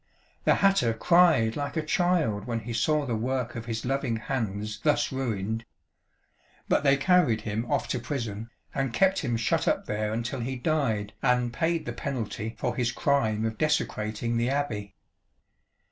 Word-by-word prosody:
The - - +5
hatter 195 - +3
cried 160 -9 +4
like 145 +1 -3
a 160 - 0
child 160 - +1
when 115 -2 -2
he 115 +2 -5
saw 150 +5 +1
the 120 -4 -1
work 125 +2 -2
of 115 0 -6
his 115 0 -3
loving 135 -2 0
hands 105 -3 -3
thus 150 +5 +1
ruined. 115 -4 -2 1.0
But - - +3
they 140 -1 +5
carried 150 - +3
him 110 +2 -3
off - - +1
to 125 - -1
prison 115 -4 -4 0.2
and 135 -3 -1
kept 190 0 +3
him 120 -6 -1
shut 115 - 0
up - - +1
there 105 0 -2
until 120 +4 -3
he 130 +3 -3
died 120 -7 0
and 125 -1 +2
paid 165 +4 0
the - - -4
penalty 115 -4 -4
for 125 -1 -2
his 120 -1 0
crime 115 -8 +1
of 110 -1 -3
desecrating 115 -6 0
the 120 +2 +1
Abbey." 110 -8 -2
120 Hz, 165 wpm, -27 LUFS, 110-140 Hz, 1.0 s, The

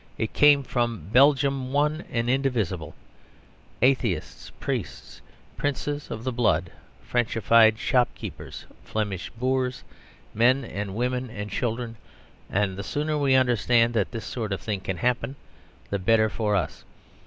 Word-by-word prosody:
It 110 - -2
came 145 -1 +6
from 120 - -2
Belgium 135 0 +4
one 150 +3 +1
and 115 -3 -1
indivisible 120 - -1 0.9
atheists, 125 - 0
priests, - - -5 0.4
princes 145 +1 -2
of 110 - -6
the 130 - -1
blood, 100 -9 +1 0.3
Frenchified 115 -2 +3
shopkeepers, 125 +1 -2 0.2
Flemish 100 - -3
boors, 130 +1 -1 0.5
men, 115 -4 +1
women, 125 +2 -1
and 105 -3 -6
children, 115 +1 -3 0.5
and 100 -1 0
the 100 - -4
sooner 150 +8 -2
we 140 -3 +3
understand 120 -2 +3
that 105 -4 +1
this 115 -2 -6
sort 110 -4 -4
of 100 - -1
thing 105 -3 -3
can 95 -1 -4
happen 125 +3 -1 0.6
the 100 - 0
better 110 +3 +3
for 105 -1 -1
us. 90 -6 -2
120 Hz, 130 wpm, -25 LUFS, 105-130 Hz, 0.9 s, came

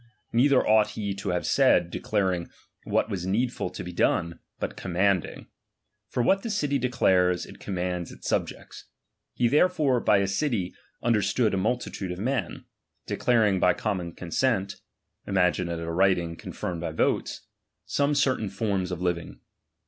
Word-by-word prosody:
Neither 130 +3 +4
ought 110 -1 +4
he 100 -2 -2
to 100 0 -5
have 90 -1 0
saiA, - - +4
declaring 95 -5 -1 0.4
v/hat - - +1
was 95 -4 -4
needful 115 0 0
to 90 - -7
be 90 0 -7
done, 85 0 +1 0.2
but - - -4
commanding; 95 -1 0 0.6
for 125 - 0
what 195 +10 +3
the 230 - -5
city 145 -9 0
declares, 95 -8 +2
it - - -13
commands 90 -2 -3
its - - -10
subjects. - - -3 0.5
He 120 - +2
therefore 150 -2 +3
by 105 - +4
a 100 0 +1
city 100 -3 -1 0.3
understood 110 0 +2
a - - +1
multitude 95 -2 -2
of 90 - -5
men, 115 -1 -2 0.4
declaring 110 -6 +2
by 90 - +4
common 90 -5 -3
consent 95 +2 -1 0.5
(imngiue 90 -2 +1
it 85 - -3
a 85 0 -4
writing 85 -2 +2
con - - -9
firmed 85 -2 -4
by 80 -2 -3
votes) - - -1 0.4
some 145 +1 +1
certain 130 -7 +1
forms 95 -2 -1
of 90 0 -4
living. 85 -1 -2
100 Hz, 155 wpm, -26 LUFS, 90-120 Hz, 0.6 s, Neither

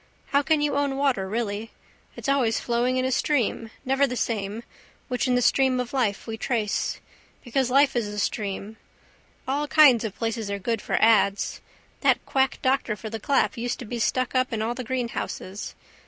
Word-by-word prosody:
How 280 0 +3
can 300 +1 +2
you 295 -1 +1
own 280 -1 0
water 255 -9 +1
really? 220 0 -2 0.5
It's - - -6
always 260 -5 +2
flowing 245 +2 0
in 255 - +1
a 260 - 0
stream, 245 -4 0 0.2
never 270 +2 +3
the 250 - -4
same, 215 -1 -2 0.5
which 250 +1 0
in 250 - +2
the 245 - +2
stream 265 0 +3
of 250 0 -4
life 225 -7 0
we 225 -1 -6
trace. 220 -4 -1 0.4
Because 255 +1 0
life 275 +1 +4
is 235 -3 0
a 210 0 -6
stream. 205 +1 -3 0.7
All 285 +3 0
kinds 285 -7 +6
of 215 -3 -5
places 225 -2 -2
are 200 - -2
good 225 +2 -2
for - - -1
ads. 215 -3 +3 0.4
That - - +2
quack 265 -1 +1
doctor 260 -4 +1
for 210 +2 -8
the 225 - -4
clap 270 +3 +1
used 245 +1 -2
to 245 - -8
be 235 +2 -5
stuck 255 +2 0
up 255 0 +1
in 220 -2 -1
all 230 +2 -1
the 255 +1 -5
greenhouses. 235 -5 -4
240 Hz, 190 wpm, -25 LUFS, 220-265 Hz, 0.7 s, kinds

